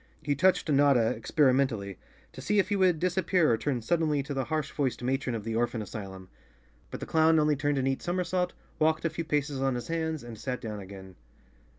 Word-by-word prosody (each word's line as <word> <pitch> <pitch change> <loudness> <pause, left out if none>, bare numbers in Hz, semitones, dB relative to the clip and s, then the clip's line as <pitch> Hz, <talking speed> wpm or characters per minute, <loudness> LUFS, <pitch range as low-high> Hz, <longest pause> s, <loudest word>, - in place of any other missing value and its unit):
He 145 - +1
touched 185 +6 +2
Notta 140 -6 +4
experimentally, 130 - +1 0.3
to - - -10
see 210 - 0
if 195 -1 +2
he 205 - +1
would 185 -4 +3
disappear 180 -2 +2
or - - +4
turn 125 -3 -2
suddenly 155 +1 +1
to 140 - -5
the 135 -2 -2
harsh 155 +1 -2
voiced 135 -4 -2
matron 130 -1 -1
of 110 - -5
the 115 0 -3
orphan 120 0 0
asylum. 95 -4 -7 0.6
But - - -7
the - - -3
clown 160 0 +4
only 150 -1 +3
turned 145 0 0
a 135 - 0
neat 135 0 0
somersault, 180 0 -1 0.3
walked 155 +1 +2
a 165 - +1
few 165 +1 -4
paces 145 -3 -1
on 135 -1 +1
his 120 - -5
hands 160 -3 -2
and 115 -2 -9
sat 125 +1 -3
down 105 -2 -6
again. 95 -2 -11
140 Hz, 210 wpm, -28 LUFS, 120-160 Hz, 0.6 s, Notta